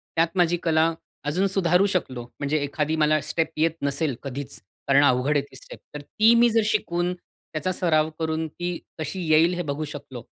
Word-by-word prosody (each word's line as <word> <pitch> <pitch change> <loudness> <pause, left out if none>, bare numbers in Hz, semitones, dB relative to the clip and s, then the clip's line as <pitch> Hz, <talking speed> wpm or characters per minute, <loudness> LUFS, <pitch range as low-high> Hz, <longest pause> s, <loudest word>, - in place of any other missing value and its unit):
त्यात 165 +1 +3
माझी 175 -1 +3
कला 160 0 +2 0.3
अजून 180 +7 +1
सुधारू 185 -1 +2
शकलो. 150 -11 -2 0.2
म्हणजे 145 +1 0
एखादी 150 +2 -1
मला 155 0 +3
स्टेप 160 +2 -1
येत 160 +1 +3
नसेल 140 0 -1
कधीच, 140 0 -6 0.3
कारण 140 +1 +5
अवघड 140 +2 +3
आहे - - +2
ती - - -15
स्टेप 130 - -12 0.2
तर 150 - -5
ती 220 +10 +3
मी 235 +1 +5
जर 225 0 +3
शिकून 180 -4 0 0.4
त्याचा 155 +4 -1
सराव 160 -4 +1
करून 160 0 -1
ती 175 +3 -4 0.2
कशी 185 +4 -4
येईल 165 +3 +5
हे 175 - -2
बघू 150 +2 -3
शकलो. 140 -4 -9
160 Hz, 185 wpm, -24 LUFS, 145-175 Hz, 0.4 s, कारण